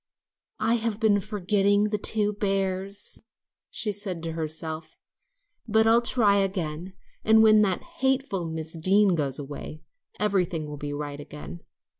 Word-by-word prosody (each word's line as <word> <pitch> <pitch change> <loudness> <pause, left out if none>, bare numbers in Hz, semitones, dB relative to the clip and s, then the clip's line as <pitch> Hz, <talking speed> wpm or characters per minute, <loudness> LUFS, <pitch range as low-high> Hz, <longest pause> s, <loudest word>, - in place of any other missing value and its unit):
"I've 225 -1 0
been 215 -3 +3
forgetting 205 0 +1
the 210 0 -1
two 210 0 +1
bears," 195 0 -1 0.5
she 215 - -2
said 190 -4 -5
to 165 - -3
herself, 160 0 -5 0.7
"but 220 0 +4
I'll 230 +1 +5
try 220 -4 +4
again, 185 -3 -2 0.3
and 220 0 +6
when 215 -1 +6
that 190 -4 +1 0.2
hateful 265 - 0
Miss 160 0 -4
Deane 190 +4 +3
goes 140 -5 -1
away, 145 +2 -8 0.4
everything 180 -6 0
will 150 0 -7
be 145 0 -5
right 145 0 -5
again. 150 +3 -9
195 Hz, 135 wpm, -26 LUFS, 160-210 Hz, 0.7 s, and